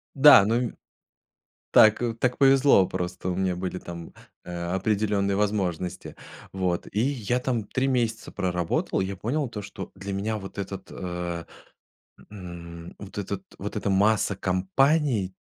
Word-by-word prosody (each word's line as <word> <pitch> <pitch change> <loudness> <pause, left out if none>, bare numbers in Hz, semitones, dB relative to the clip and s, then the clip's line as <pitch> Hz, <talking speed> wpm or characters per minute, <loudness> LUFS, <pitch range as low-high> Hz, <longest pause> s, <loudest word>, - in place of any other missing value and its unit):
Да, 140 -8 +9
ну, 110 +3 +1
м 120 -1 -1 0.9
Так 110 +1 +6 0.2
так 125 0 +1
повезло, 135 -7 +6
просто 90 0 -4
у 90 - -1
меня 95 -1 0
были 90 0 -4
там, 85 -1 -9 0.3
а, 85 0 -4
определённые 100 0 +1
возможности. 95 -4 -2 0.4
Вот, 90 -2 -1
и 105 - -1
я 125 -2 0
там 125 -3 -1
3 130 +6 -1
месяца 115 -4 -1
проработал, 90 -2 -1
и - - 0
я 95 +1 -4
понял, 135 +9 -1
то 105 -3 -6
что 100 - -8
для 100 0 -6
меня 105 +3 -2
вот 95 -1 -8
этот, 100 -1 -6
э, 85 -2 -4 0.9
м, 85 -3 -9
вот 100 -1 -10
этот 100 0 -4 0.2
вот - - -5
эта - - -1
масса 100 +1 +3
компаний 95 - +1
100 Hz, 145 wpm, -26 LUFS, 90-115 Hz, 0.9 s, Да